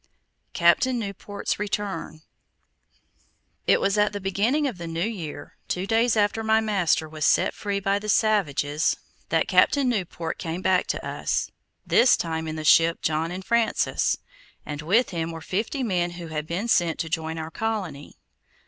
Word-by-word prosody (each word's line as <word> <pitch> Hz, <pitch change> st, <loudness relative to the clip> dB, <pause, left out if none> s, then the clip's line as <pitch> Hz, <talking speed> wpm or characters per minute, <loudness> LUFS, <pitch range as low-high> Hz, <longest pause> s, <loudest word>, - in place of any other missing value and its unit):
CAPTAIN 255 Hz, -1 st, +3 dB
NEWPORT'S 200 Hz, -2 st, -4 dB
RETURN 200 Hz, -6 st, -4 dB, 1.4 s
It -, -, +5 dB
was 200 Hz, +1 st, +1 dB
at 205 Hz, 0 st, +2 dB
the 205 Hz, -, -3 dB
beginning 210 Hz, +10 st, +1 dB
of 240 Hz, -10 st, -3 dB
the 170 Hz, -, -5 dB
new 165 Hz, 0 st, -4 dB
year, 170 Hz, -10 st, -6 dB
two 180 Hz, +1 st, -2 dB
days 225 Hz, +2 st, +2 dB
after 210 Hz, +2 st, +1 dB
my 220 Hz, 0 st, +3 dB
master 195 Hz, -7 st, +1 dB
was 155 Hz, 0 st, -6 dB
set -, -, +3 dB
free 200 Hz, -1 st, -2 dB
by 195 Hz, +1 st, +1 dB
the 210 Hz, +1 st, -6 dB
savages, 160 Hz, -, +2 dB, 0.3 s
that -, -, +1 dB
Captain 280 Hz, -3 st, +4 dB
Newport 180 Hz, -7 st, -2 dB
came 170 Hz, +1 st, -4 dB
back 185 Hz, -1 st, +2 dB
to -, -, -3 dB
us, -, -, -2 dB, 0.3 s
this 245 Hz, -, +5 dB
time 160 Hz, -1 st, -3 dB
in 155 Hz, -, -4 dB
the 155 Hz, -, -5 dB
ship 165 Hz, +2 st, +4 dB
John 160 Hz, +1 st, 0 dB
and 185 Hz, +2 st, -6 dB
Francis, 235 Hz, -1 st, +1 dB, 0.5 s
and 150 Hz, 0 st, -5 dB
with 200 Hz, +11 st, +2 dB
him 165 Hz, -2 st, -2 dB
were 165 Hz, -, -7 dB
fifty 220 Hz, -, -2 dB
men 175 Hz, -6 st, 0 dB
who 175 Hz, -1 st, -8 dB
had 155 Hz, -1 st, -4 dB
been 185 Hz, +8 st, -2 dB
sent 170 Hz, -7 st, +2 dB
to 165 Hz, -, -3 dB
join 160 Hz, 0 st, -3 dB
our 160 Hz, 0 st, -5 dB
colony. 190 Hz, -9 st, -4 dB
190 Hz, 165 wpm, -25 LUFS, 160-215 Hz, 1.4 s, It